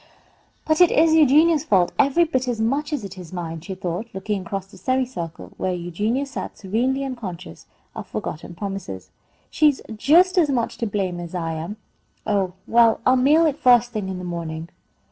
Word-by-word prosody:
"But 315 Hz, +2 st, +2 dB
it 355 Hz, -, +8 dB
is 315 Hz, +1 st, +4 dB
Eugenia's 310 Hz, +1 st, +5 dB
fault 185 Hz, -4 st, +2 dB
every 280 Hz, +5 st, +4 dB
bit 260 Hz, -6 st, -1 dB
as 240 Hz, -3 st, -2 dB
much 280 Hz, +7 st, 0 dB
as 290 Hz, -7 st, -2 dB
it 190 Hz, -1 st, -8 dB
is 175 Hz, -3 st, -10 dB
mine," 165 Hz, -3 st, -5 dB
she 190 Hz, +3 st, -6 dB
thought, 185 Hz, +4 st, -4 dB
looking 200 Hz, +1 st, -2 dB
across 190 Hz, +1 st, -5 dB
the 195 Hz, -, -18 dB
semicircle, 255 Hz, -11 st, -3 dB
where 185 Hz, -1 st, -1 dB
Eugenia 205 Hz, +10 st, -2 dB
sat 275 Hz, -, -7 dB
serenely 250 Hz, +8 st, -1 dB
unconscious 195 Hz, -, -7 dB, 0.3 s
of -, -, -7 dB
forgotten 165 Hz, +3 st, -6 dB
promises. 195 Hz, -, -6 dB, 0.4 s
"She's 300 Hz, -3 st, +3 dB, 0.2 s
just 360 Hz, -, +4 dB
as 315 Hz, -4 st, +3 dB
much 245 Hz, -4 st, -1 dB
to 230 Hz, -, -1 dB
blame 190 Hz, -4 st, -2 dB
as 175 Hz, +1 st, -7 dB
I 165 Hz, -2 st, -2 dB
am. 165 Hz, +7 st, -5 dB, 0.5 s
Oh, 195 Hz, -4 st, 0 dB
well, 230 Hz, -1 st, +4 dB
I'll 255 Hz, -, +5 dB
mail 295 Hz, +6 st, +4 dB
it 295 Hz, -2 st, 0 dB
first 245 Hz, -1 st, +5 dB
thing 210 Hz, -4 st, -4 dB
in 190 Hz, -, -4 dB
the 180 Hz, -, -7 dB
morning." 165 Hz, -2 st, -5 dB
215 Hz, 185 wpm, -22 LUFS, 180-270 Hz, 0.5 s, it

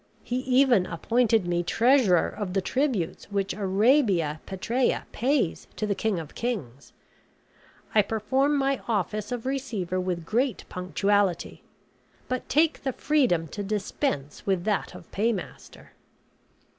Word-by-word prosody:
He 245 Hz, -, -2 dB
even 255 Hz, -6 st, +3 dB
appointed 225 Hz, +4 st, +1 dB
me 175 Hz, 0 st, 0 dB
treasurer 225 Hz, -1 st, +3 dB
of 200 Hz, -4 st, -5 dB
the 195 Hz, -, +1 dB
tributes 255 Hz, -, -1 dB
which 200 Hz, -1 st, -1 dB
Arabia 195 Hz, -, +2 dB
Petræa 235 Hz, +7 st, 0 dB
pays 255 Hz, -, 0 dB
to 215 Hz, -, -2 dB
the 205 Hz, -, 0 dB
king 215 Hz, -1 st, -1 dB
of 160 Hz, -2 st, -9 dB
kings. 145 Hz, -, -4 dB, 1.0 s
I 215 Hz, -, +6 dB
perform 260 Hz, +8 st, +1 dB
my 275 Hz, -1 st, 0 dB
office 210 Hz, 0 st, -1 dB
of 245 Hz, -1 st, -4 dB
receiver 230 Hz, -10 st, -2 dB
with 180 Hz, -2 st, -2 dB
great 240 Hz, +4 st, 0 dB
punctuality; 190 Hz, 0 st, 0 dB, 0.7 s
but 255 Hz, 0 st, -3 dB
take 315 Hz, +3 st, +2 dB
the 265 Hz, -1 st, -2 dB
freedom 245 Hz, -, +1 dB
to 205 Hz, -, -5 dB
dispense 195 Hz, -, -2 dB
with 190 Hz, -3 st, 0 dB
that 210 Hz, -1 st, -1 dB
of -, -, -13 dB
paymaster. 210 Hz, -1 st, -3 dB
210 Hz, 130 wpm, -26 LUFS, 185-255 Hz, 1.0 s, I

